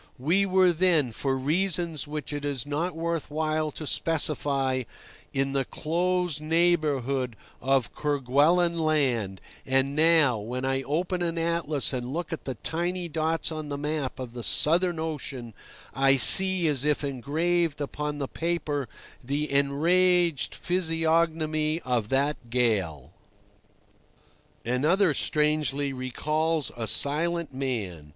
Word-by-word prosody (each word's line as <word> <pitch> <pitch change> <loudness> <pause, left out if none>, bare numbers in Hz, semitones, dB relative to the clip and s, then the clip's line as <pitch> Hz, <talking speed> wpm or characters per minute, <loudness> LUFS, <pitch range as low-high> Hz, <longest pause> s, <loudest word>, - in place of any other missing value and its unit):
We 175 +10 +1
were 185 -1 +4
then, 165 -7 +2
for 135 +4 -2
reasons 165 +1 -1
which 150 0 -5
it 145 0 -5
is 140 -3 -3
not 155 +4 -3
worth 165 -1 -3
while 155 0 -1
to 155 - -8
specify, 140 -4 0 0.5
in 135 0 -1
the 135 -1 +1
close 175 +1 -2
neighbourhood 150 -7 0 0.3
of 130 -3 0
Kerguelen 150 +5 +1
Land; 130 -11 0 0.2
and 135 +1 0
now, 155 -6 +4
when 125 +5 -5
I 135 0 0
open 175 +6 -2
an 170 -1 -2
atlas 165 -4 -1
and 125 0 -3
look 170 -1 -4
at 165 - -7
the 130 - -4
tiny 175 - -3
dots 160 +1 -1
on 155 -1 -6
the 140 - -4
map 150 -2 -3
of 125 -2 -7
the 120 - -6
Southern 170 - +3
Ocean, 140 -7 -5 0.4
I 135 +2 +3
see 190 +5 +7
as 140 -4 +1
if 150 0 0
engraved 155 +5 -1
upon 150 +1 -4
the 140 -2 -3
paper 150 -6 -3 0.3
the 145 +4 -3
enraged 165 +4 +2
physiognomy 160 -2 0
of 120 -4 -2
that 135 -2 -1
gale. 100 - -1 1.5
Another, 155 - +2
strangely, 150 -2 0
recalls 150 +4 -1
a 115 -2 -3
silent 165 +3 +3
man. 105 - -4
150 Hz, 130 wpm, -26 LUFS, 135-165 Hz, 1.5 s, see